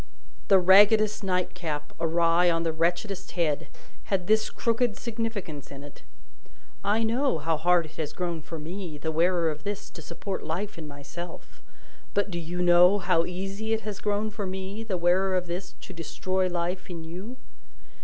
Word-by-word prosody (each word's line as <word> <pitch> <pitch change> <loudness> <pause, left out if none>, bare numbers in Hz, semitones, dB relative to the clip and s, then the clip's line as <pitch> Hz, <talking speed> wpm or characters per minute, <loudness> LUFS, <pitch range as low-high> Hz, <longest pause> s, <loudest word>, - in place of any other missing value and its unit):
The 195 - +7
raggedest 205 +3 +6
nightcap, 180 -5 -2
awry 170 +1 +3
on 165 -1 +1
the 165 -1 0
wretchedest 175 +4 -1
head, 160 -5 0 0.4
had 190 -3 0
this 215 +3 +3
crooked 230 -1 0
significance 220 - -4
in 140 0 -9
it: 145 - -12 0.8
"I 215 +3 +2
know 245 - +1
how 160 +2 0
hard 175 +2 +3
it 155 - -14
has 150 -2 -3
grown 170 -3 -3
for 165 +2 -7
me, 165 0 -6
the 160 +2 -2
wearer 170 0 +2
of 150 0 -8
this, 205 0 -5
to 165 - -10
support 175 +5 -5
life 180 +3 -3
in 155 - -7
myself; 145 +5 -9 0.5
but 205 0 +1
do 170 - -2
you 175 +2 -3
know 175 +3 +7
how 170 -3 +2
easy 195 +5 -3
it 220 - 0
has 210 -3 -5
grown 210 +1 0
for 205 -2 -4
me, 190 +3 -5
the 205 -5 -2
wearer 185 +2 +3
of 180 - -1
this, 180 +2 -5
to 190 - -9
destroy 185 +3 -1
life 175 +2 -2
in 170 -2 -6
you?" 185 +10 -7
180 Hz, 175 wpm, -27 LUFS, 165-200 Hz, 0.8 s, The